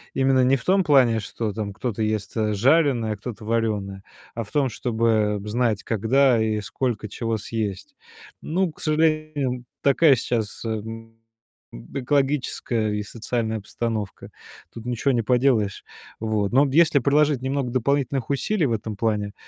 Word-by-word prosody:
Именно 135 -1 +3
не 130 +2 +4
в 125 - -7
том 190 +1 +3
плане, 125 -7 +4
что 105 0 -4
там 105 -3 -4
кто-то 115 -1 -4
ест, 105 -1 -2
э, 105 -1 +1
жареное, 125 -1 +3
а - - -8
кто-то 105 -1 -8
варёное, 105 -4 -1 0.3
а 115 - -3
в 105 - -16
том, 140 -3 +1
чтобы 110 -3 0
знать, 110 -1 0
когда 115 +2 +3
и 110 -1 0
сколько 110 0 -3
чего 115 +1 -2
съесть. 110 - -4 0.5
Ну, 175 +1 0
к - - -17
сожалению, 155 -5 0 0.2
такая 140 0 +5
сейчас, 115 -2 -3
эм, 115 +1 -5 0.8
экологическая 135 -5 0
и 105 - -2
социальная 110 +1 -3
постановка. 110 -2 -4 0.4
Тут 115 0 -9
ничего 125 +3 0
не 120 - +2
поделаешь, 120 -5 +1 0.4
вот. 110 -1 -1
Но 135 +2 +6
вот 135 - -3
если 160 -3 +5
приложить 145 0 +2
немного 130 -2 -2
дополнительных 135 0 0
усилий 155 +6 0
в 120 - 0
этом 110 -1 -4
плане, 105 -2 -1
115 Hz, 150 wpm, -23 LUFS, 110-135 Hz, 0.8 s, Но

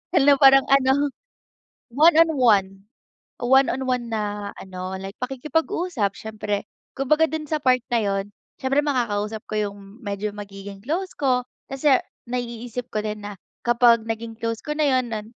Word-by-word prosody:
hala 285 -2 +6
parang 270 -1 +7
ano. 275 +1 +3 0.8
One 310 +4 +5
on 330 -1 +5
one, 210 -7 +4 0.7
one 265 +2 +4
on 265 - -3
one 240 -2 -1
na 205 -1 -3
ano 185 0 -6
like 195 +2 -8
pakikipag-usap 285 - -1
siyempre 210 -2 -4 0.3
kumbaga 305 +4 +3
dun 315 -1 -4
sa 310 - 0
part 255 -2 +3
na - - +4
yun 195 -1 0 0.4
siyempre 270 +2 +2
makakausap 220 -6 -1
ko - - -5 0.2
yung 200 - -14 0.3
medyo 200 +1 -2
magiging 195 -1 -9
close 365 +7 -2
ko, 255 -3 +1 0.3
kasi 270 0 +3 0.3
naiisip 245 0 -4
ko 215 - 0
din 210 -1 -4
na 205 -1 -7 0.3
kapag 235 -1 +5
naging 225 0 -4
close 230 0 -3
ko 300 - -3
na 305 -1 +2
yun 245 -2 -2
nun. 215 -1 -4
240 Hz, 155 wpm, -23 LUFS, 210-270 Hz, 0.8 s, parang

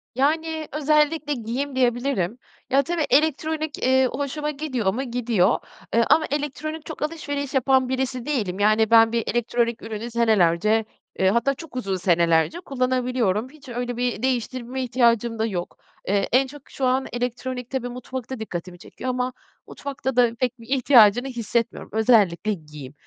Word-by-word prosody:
Yani, 315 +3 0
özellikle 300 0 +2
giyim 255 +3 -4
diyebilirim. 245 -4 0 0.3
Ya, 275 +2 +4
tabii 330 +1 -1
elektronik, 310 +1 +1
eee, 260 +1 +3
hoşuma 285 +2 -3
gidiyor 260 -10 -1
mu, 265 +4 -2
gidiyor. 235 -5 +1 0.3
Eee, 230 0 +4
ama 310 0 +5
elektronik 300 +2 -3
çok 315 - -8
alışveriş 285 -3 -3
yapan 265 -1 +3
birisi 260 -1 -2
değilim. 205 -10 -2
Yani, 215 +1 +3
ben 225 -1 +7
bir 230 -1 0
elektronik 235 0 0
ürünü 225 +2 -6
senelerce, 215 -2 +3 0.3
eee, 190 0 +4
hatta 235 +6 +2
çok 295 -2 -12
uzun 195 -7 -2
senelerce 170 - +2
kullanabiliyorum. 255 - 0
Hiç 285 -2 -15
öyle 245 0 -4
bir 245 -2 -1
değiştirme 255 0 -2
ihtiyacım 235 -2 +2
da 220 - +2
yok. 180 -5 -4 0.3
Eee, 200 +1 +1
en 265 +2 +4
çok 285 +1 -13
şu 265 - -2
an 260 +1 +2
elektronik 250 0 -3
tabii 255 -2 -3
mutfakta 255 0 -6
dikkatimi 180 -4 -6
çekiyor 255 - -7
ama 250 0 -1 0.3
mutfakta 265 -2 -5
da 240 -2 +3
pek 250 -1 -1
bir 230 - -13
ihtiyacını 245 -3 +5
hissetmiyorum, 235 -2 -2
özellikle 215 -4 +3
giyim. 150 -5 -10
250 Hz, 150 wpm, -23 LUFS, 225-275 Hz, 0.3 s, ben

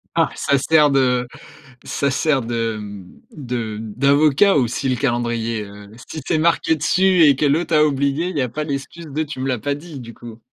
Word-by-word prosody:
Ah! - - +2
Ça 140 - +1
sert 150 +1 +4
de 125 -2 +2 0.6
ça 140 -1 -1
sert 140 0 +1
de, 115 -2 -3
mmh, 100 -3 -10 0.2
de 120 -6 -4
d'avocat 140 - +3
aussi, 130 +1 0
le 130 - +1
calendrier, 120 -4 -1
heu. 100 0 -13 0.2
Si 155 - -7
c'est 160 - +1
marqué 165 0 +2
dessus 185 +4 +3
et 140 -3 +5
que 145 - -1
l'autre 160 +3 +1
a 150 - +5
oublié, 140 +4 0
il 185 - -6
y - - +1
a 125 - 0
pas 150 +6 -4
d'excuse 150 +3 -6
de: 150 +2 -3
«Tu 145 -3 -8
me 135 - -2
l'as 125 -2 -1
pas 140 +6 -2
dit», 150 -1 -10
du 115 -1 -10
coup. 115 -1 -12
140 Hz, 205 wpm, -20 LUFS, 120-150 Hz, 0.6 s, et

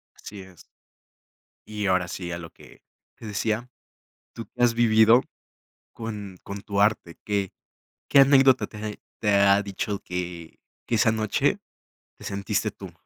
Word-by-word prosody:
Así 105 -1 -10
es. 95 -2 -16 1.0
Y 105 -1 -4
ahora 90 -1 +1
sí, 90 -1 -6
a 85 - -4
lo 80 -1 -9
que - - -18 0.4
te - - -12
decía, 110 +3 -2 0.6
¿tú 115 - -8
que - - -9
has 120 -1 +4
vivido 115 +1 +5 0.7
con 105 -4 -7
con 100 0 -7
tu 100 -1 -2
arte? 105 -5 +1
¿Qué 100 -3 -1 0.6
qué 140 - +6
anécdota 135 -1 +5
te - - -14
ha 110 0 -4
e 105 - -10 0.2
te 105 -2 +1
ha 100 0 +5
dicho 100 +1 -4
que 90 -2 -6 0.3
que 120 - 0
esa 110 0 +3
noche 110 -2 0 0.6
te - - -15
sentiste 100 +2 -2
tú? 95 -3 -11
105 Hz, 155 wpm, -25 LUFS, 95-110 Hz, 1.0 s, qué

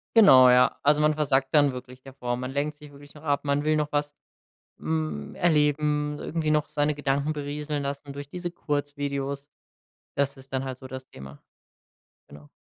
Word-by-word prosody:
Genau, 130 - +8
ja. 125 0 +5
Also, 150 +1 +4
man 150 0 +4
versackt 135 -3 +1
dann 145 -2 +5
wirklich 125 0 -10
davor. 130 -2 -4
Man 125 +1 -5
lenkt 145 +2 -2
sich 150 -1 -13
wirklich 145 0 -15
noch 150 - -14
ab, 145 -2 0
man 140 0 +1
will 155 0 +2
noch 150 -1 -1
was, 145 0 0 0.7
hm, 75 -2 -3
erleben, 150 -2 +1
irgendwie 160 -1 -2
noch 150 -1 +2
seine 150 0 0
Gedanken 145 +1 0
berieseln 145 0 -4
lassen 140 0 -5
durch 140 0 -8
diese 175 +2 -5
Kurzvideos. 145 -3 -3 0.7
Das 140 0 0
ist 135 0 -15
dann 130 0 -1
halt 130 -1 -5
so 130 - -10
das 130 0 -8
Thema. 65 - -12 0.9
Genau. 75 0 -14
145 Hz, 175 wpm, -26 LUFS, 130-150 Hz, 0.9 s, Genau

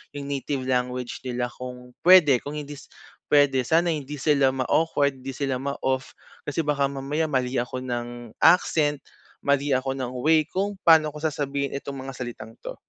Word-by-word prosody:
yung 145 - -5
native 135 -1 -2
language 125 -1 -2
nila 125 0 -2
kung 125 0 -9 0.2
pwede. 155 -9 +7
Kung 145 +4 -7
hindi 145 -1 -7 0.5
pwede, 140 -3 +4
sana 165 +6 +2
hindi 145 0 -6
sila 140 -2 +3
ma-awkward, 140 0 +1
di 135 - -4
sila 135 -2 -1
ma-off. 130 -1 -2 0.4
Kasi 155 +3 -1
baka 140 -2 +2
mamaya 140 +4 -2
mali 130 0 0
ako 125 +1 -3
ng 120 -2 -5
accent, 155 -4 +4 0.4
mali 140 0 +1
ako 130 +1 -1
ng 130 -2 -4
way 155 0 +5
kung 200 +4 -2
paano 155 -2 +6
ko 150 - -6
sasabihin 140 -2 -2
itong 140 0 -5
mga 135 +1 -6
salitang 120 -2 -7
to. - - -6
140 Hz, 165 wpm, -25 LUFS, 130-150 Hz, 0.5 s, pwede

